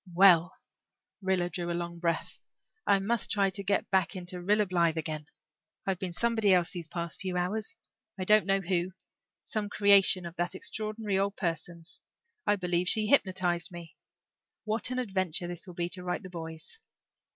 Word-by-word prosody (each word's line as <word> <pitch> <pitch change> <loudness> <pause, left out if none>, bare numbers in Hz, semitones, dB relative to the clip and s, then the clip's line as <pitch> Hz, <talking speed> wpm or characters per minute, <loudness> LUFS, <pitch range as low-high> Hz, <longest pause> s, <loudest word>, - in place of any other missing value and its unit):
"Well" 180 -2 +6 0.7
Rilla 190 -2 +1
drew 175 -1 -3
a 170 - -1
long 170 0 -5
breath 170 -1 -2 0.5
"I 200 - +5
must 210 +3 0
try 195 -2 +2
to 200 - -2
get 200 +1 0
back 190 0 +2
into 180 0 -5
Rilla 210 +3 +3
Blythe 170 -3 +1
again. 155 -1 -4 0.6
I've 190 -2 -1
been 185 -2 -3
somebody 220 +1 +2
else 175 -2 +3
these 170 -3 -4
past 170 -1 -3
few 185 -2 -2
hours 195 +5 -2 0.4
I 185 - -3
don't 210 +1 +4
know 195 0 +4
just 180 - -10
who 180 0 +1 0.5
some 210 -2 -2
creation 200 -3 +5
of 170 0 -7
that 175 +1 -1
extraordinary 215 0 -2
old 200 +1 0
person's. 170 -1 -4 0.5
I 205 - +4
believe 180 -1 0
she 215 -1 +3
hypnotized 185 - +2
me. 170 -2 -10 0.7
What 220 +2 -1
an 255 - -3
adventure 190 -8 -1
this 175 +1 -5
will 180 - -10
be 175 0 -1
to 180 0 -4
write 180 +2 -3
the 185 - -9
boys." 165 - -7
185 Hz, 175 wpm, -29 LUFS, 175-200 Hz, 0.7 s, Well